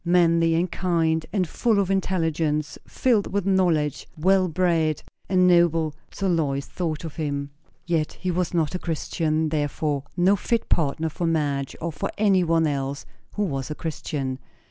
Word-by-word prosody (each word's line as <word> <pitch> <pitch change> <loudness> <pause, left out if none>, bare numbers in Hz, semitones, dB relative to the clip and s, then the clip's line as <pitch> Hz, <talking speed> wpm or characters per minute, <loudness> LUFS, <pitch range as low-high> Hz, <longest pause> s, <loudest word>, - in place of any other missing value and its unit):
Manly 170 -2 +3
and 175 +1 0
kind, 165 -3 +1
and 185 -4 0
full 225 +5 +1
of 195 -1 +1
intelligence, 160 -5 0
filled 230 -6 +1
with 200 -2 -1
knowledge, 170 -7 +1
well 185 +3 +3
bred, 165 -3 +1 0.3
and 185 -1 +4
noble; 170 -3 +4 0.2
so 195 - -2
Lois 145 -6 0
thought 165 -4 -3
of 160 -1 -7
him. 140 -2 -3 0.3
Yet 165 -3 0
he 185 - -3
was 180 -1 -1
not 165 -2 0
a 180 - -2
Christian, 160 -1 -1
therefore 145 -1 -1 0.2
no 185 +3 +4
fit 230 +3 -1
partner 160 0 +1
for 170 +2 -2
Madge 145 -4 -1
or 165 0 -3
for 145 - -3
any 200 -3 +4
one 165 -1 +2
else 140 -1 -2 0.3
who 210 - 0
was 135 -7 -3
a 150 - -4
Christian. 140 -5 -4
165 Hz, 165 wpm, -24 LUFS, 150-180 Hz, 0.3 s, and